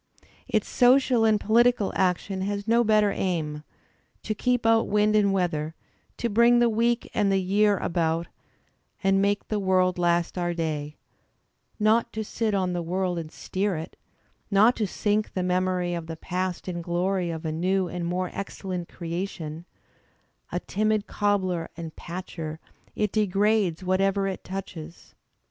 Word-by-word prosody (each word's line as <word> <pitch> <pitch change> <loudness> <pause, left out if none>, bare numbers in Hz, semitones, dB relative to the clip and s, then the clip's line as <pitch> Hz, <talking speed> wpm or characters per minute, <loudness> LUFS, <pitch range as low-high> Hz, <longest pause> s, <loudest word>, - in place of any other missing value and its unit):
Its 215 -2 0
social 250 -2 +4
and 215 -1 +4
polit 230 +4 +4
ical 205 -5 -2
action 190 +1 0
has 200 +1 -3
no 235 +1 +4
better 215 -2 +3
aim; 155 -6 -2 0.6
to 215 - -1
keep 245 +2 0
out 225 0 +4
wind 210 +1 +2
and 205 -2 +4
weather, 165 -4 -1 0.4
to 235 - -1
bring 235 +2 +5
the 240 -1 +4
week 235 +2 +1
and 205 -2 +2
the 195 - +3
year 200 +2 +2
about, 165 -1 0 0.8
and 195 0 +3
make 200 +1 0
the 215 - -1
world 185 -2 +2
last 175 +1 +1
our 175 -1 -1
day; 150 -3 -3 0.8
not 215 +2 +3
to 220 - -3
sit 215 0 -1
on 185 -2 0
the 175 - -1
world 180 +1 -1
and 160 -1 -7
steer 190 0 -2
it; 160 - -7 0.5
not 215 +4 +5
to 215 - -1
sink 210 +3 -1
the 185 - 0
memory 180 -1 0
of 170 -2 -4
the 165 -1 -6
past 180 +2 -3
in 180 -2 -3
the - - -4
glory 180 +1 -1
of 165 0 -5
a 155 - -1
new 185 +4 0
and 175 -1 -4
more 180 +1 -2
excel 195 -1 -6
lent 175 -2 -4
creation; 170 -2 -5 0.9
a - - -1
timid 215 0 0
cobbler 185 -5 0
and 165 -2 -7
patcher, 170 -3 -6 0.4
it 210 -2 0
degrades 205 -3 +1
what 185 +1 +1
ever 195 0 +1
it 190 - -4
touches. 175 -4 -8
190 Hz, 165 wpm, -26 LUFS, 175-210 Hz, 0.9 s, bring